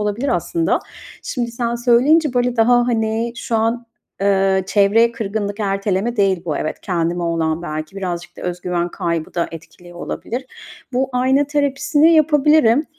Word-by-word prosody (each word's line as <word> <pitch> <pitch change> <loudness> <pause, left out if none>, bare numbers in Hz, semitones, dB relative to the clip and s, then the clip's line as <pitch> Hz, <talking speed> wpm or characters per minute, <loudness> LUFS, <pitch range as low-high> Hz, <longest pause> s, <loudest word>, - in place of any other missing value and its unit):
olabilir 210 +6 -2
aslında. 335 -1 0 0.4
Şimdi 240 -2 -3
sen 235 0 -2
söyleyince, 255 +5 +3
böyle, 245 0 +1
daha, 240 +1 +4
hani, 225 0 -1
şu 230 - -2
an, 230 +2 -1 0.3
eee, 195 -1 +2
çevreye 215 +4 +3
kırgınlık 210 -2 -4
Erteleme 200 +3 -1
değil 195 -4 +2
bu 155 -4 -2
evet, 155 - -4
kendime 175 -1 -1
olan 165 -1 -1
belki, 155 +3 -6
birazcık 180 -2 -5
da - - -10
öz 180 0 -4
güven 175 -1 -1
kaybı 170 -2 -3
da 170 - -1
etkili 175 +2 -12
olabilir. 245 +8 -5 0.5
Bu 260 +2 0
ayna 260 +3 +2
terapisini 290 +2 +2
yapabilirim. 300 -3 +4
225 Hz, 150 wpm, -19 LUFS, 180-250 Hz, 0.5 s, daha